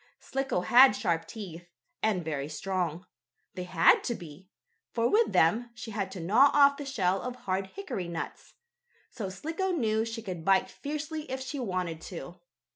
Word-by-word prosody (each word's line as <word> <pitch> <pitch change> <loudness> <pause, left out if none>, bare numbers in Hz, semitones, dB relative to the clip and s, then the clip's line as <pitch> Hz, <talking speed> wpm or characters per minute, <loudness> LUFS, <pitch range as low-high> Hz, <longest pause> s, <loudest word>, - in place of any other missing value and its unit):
Slicko 270 -8 -2
had 245 +5 +7
sharp 165 -5 -1
teeth, 175 -5 -8 0.3
and 195 -6 +1
very 145 -2 -3
strong. 175 +1 -2 0.5
They 180 -1 -5
had 175 -2 +5
to 235 - -1
be, 175 +2 -12 0.4
for 230 0 +1
with 445 - +3
them 225 +9 +3
she 230 - -7
had 200 -2 -2
to 190 - -7
gnaw 220 +12 +5
off 280 -1 +6
the 290 - -6
shell 195 -8 +1
of 250 0 -4
hard 190 -4 -2
hickory 260 - -4
nuts. 170 -1 -6 0.6
So 205 -5 -5
Slicko 325 - -3
knew 220 -11 +1
she 225 0 -5
could 180 -5 -5
bite 195 +1 +3
fiercely 305 +1 -5
if 260 +1 -3
she 265 +2 -5
wanted 180 -8 -3
to. 175 0 -8
200 Hz, 170 wpm, -29 LUFS, 180-260 Hz, 0.6 s, had